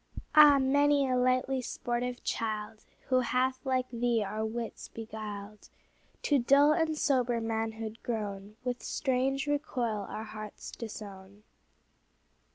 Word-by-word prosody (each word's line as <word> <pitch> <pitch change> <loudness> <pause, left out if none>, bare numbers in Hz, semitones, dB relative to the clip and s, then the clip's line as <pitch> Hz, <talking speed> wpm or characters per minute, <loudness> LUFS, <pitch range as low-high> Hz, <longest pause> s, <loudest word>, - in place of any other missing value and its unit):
Ah! 300 -2 +9
many 280 +1 +3
a 255 - +1
lightly 255 +1 +2
sportive 245 +1 -3
child, 215 -1 -3 0.2
Who 255 -1 +4
hath 255 +1 0
like 260 -2 0
thee 235 -2 +1
our 215 +2 -3
wits 225 +1 -4
beguiled, 215 -2 -8 0.5
To 290 -2 +3
dull 280 +5 +5
and 315 -1 0
sober 250 -5 +2
manhood 225 0 -3
grown, 205 -3 -4
With 250 -1 -2
strange 270 +1 0
recoil 250 -8 -1
our 215 - -5
hearts 215 -1 -8
disown. 205 -3 -9
240 Hz, 120 wpm, -30 LUFS, 220-265 Hz, 0.5 s, Ah